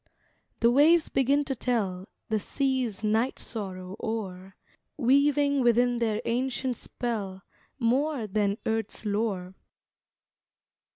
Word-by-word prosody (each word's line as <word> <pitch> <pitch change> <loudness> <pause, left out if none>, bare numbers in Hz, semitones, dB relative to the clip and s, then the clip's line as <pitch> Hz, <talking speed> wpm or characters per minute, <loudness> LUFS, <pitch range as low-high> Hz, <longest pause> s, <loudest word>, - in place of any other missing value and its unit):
The 235 - +5
waves 310 +5 +5
begin 280 +2 +2
to 270 - -1
tell 205 -7 -1 0.2
The 220 -1 +1
sea's 255 -4 -1
night 220 +4 +1
sorrow 190 -4 -5
o'er, 195 -4 -4 0.4
Weaving 280 +1 +3
within 240 0 +3
their 220 -3 0
ancient 255 +1 -1
spell 200 -6 -4 0.3
More 265 +1 +1
Than 205 0 0
earth's 225 0 -2
lore. 200 -3 -1
230 Hz, 105 wpm, -28 LUFS, 205-265 Hz, 0.4 s, The